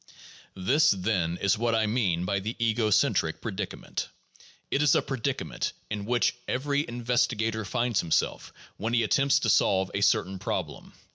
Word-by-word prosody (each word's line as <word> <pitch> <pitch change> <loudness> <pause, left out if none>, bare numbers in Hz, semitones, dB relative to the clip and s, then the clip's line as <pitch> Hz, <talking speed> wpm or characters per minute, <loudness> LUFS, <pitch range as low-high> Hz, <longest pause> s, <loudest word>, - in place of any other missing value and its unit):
This, 140 +12 +3
then, 90 -4 0
is 100 +2 +1
what 115 -1 +1
I 110 -1 +2
mean 100 -6 0
by 100 +2 0
the 110 +5 -4
ego 115 -1 +1
centric 105 - +2
predicament. - - -5 0.6
It 140 - +1
is 150 -2 +4
a - - +4
predicament 130 -5 -3 0.2
in 105 -1 -3
which 120 +2 +2
every 140 +2 -1
investigator 115 -2 0
finds 120 +1 0
himself 80 - -1 0.3
when 115 +3 -1
he 120 - +3
attempts 140 +4 +3
to 110 - 0
solve 95 -2 +2
a 100 - -1
certain 95 -1 +2
problem. - - -4
110 Hz, 155 wpm, -27 LUFS, 100-120 Hz, 0.6 s, is